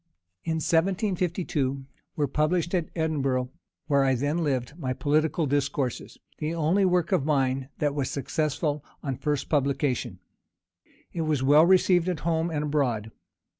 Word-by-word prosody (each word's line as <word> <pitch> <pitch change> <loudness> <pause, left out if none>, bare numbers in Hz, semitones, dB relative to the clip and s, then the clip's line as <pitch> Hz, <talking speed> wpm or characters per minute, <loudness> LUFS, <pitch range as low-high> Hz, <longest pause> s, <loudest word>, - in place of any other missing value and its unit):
In 165 - -1
1752 170 - 0 0.3
were 145 -2 0
published 165 +5 0
at 175 -4 0
Edinburgh, 135 -6 0 0.3
where 140 -3 +3
I 135 -1 +3
then 145 +6 -1
lived, 130 -3 -1
my 130 -5 -2
Political 155 +4 +1
Discourses, 140 -2 -2 0.2
the 155 +2 -2
only 170 +5 +2
work 180 -2 +1
of - - +2
mine 135 -2 0
that 145 -1 0
was 140 -3 -2
successful 150 +1 -2 0.2
on 135 - -2
the - - -9
first 150 -2 -1
publication. 135 - 0 1.0
It 170 - -2
was 155 -4 0
well 150 +4 +6
received 185 -1 +4
at 175 -4 -3
home 165 0 0
and 150 -3 -2
abroad. 125 -8 -1
150 Hz, 145 wpm, -26 LUFS, 135-165 Hz, 1.0 s, well